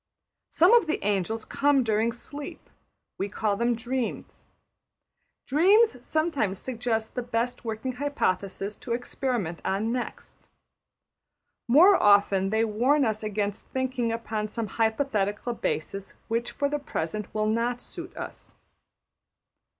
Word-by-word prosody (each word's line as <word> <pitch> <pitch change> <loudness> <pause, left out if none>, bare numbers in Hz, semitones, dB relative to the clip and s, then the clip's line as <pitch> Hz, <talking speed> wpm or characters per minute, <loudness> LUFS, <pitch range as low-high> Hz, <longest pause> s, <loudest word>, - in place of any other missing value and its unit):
Some 355 +7 +5
of 470 -7 +6
the 315 - +1
angels 210 +2 0
come 280 -2 +2
during 220 0 +1
sleep; 285 +5 -8 0.5
we 195 - -1
call 210 0 0
them 235 +3 +1
dreams. 245 +1 -4 1.0
Dreams 400 - +5
sometimes 290 - 0
suggest 230 -1 -2
the 250 - -2
best 240 +1 -2
working 225 +3 -3
hypothesis 205 -7 -2
to 235 - -4
experiment 240 -7 -2
on 210 +4 0
next. 245 0 -6 1.2
More 345 +11 +7
often 200 -2 +4
they 220 +2 +2
warn 255 +7 +2
us 215 -1 -1
against 205 -1 -3
thinking 260 -3 -1
upon 220 -2 -3
some 230 +1 -3 0.2
hypothetical 220 -1 0
basis 195 -2 -3
which 230 +1 0
for 285 - -1
the 295 +1 -2
present 210 - -4
will 215 0 0
not 230 +3 0
suit - - -9
us. - - -8
230 Hz, 125 wpm, -27 LUFS, 210-260 Hz, 1.2 s, More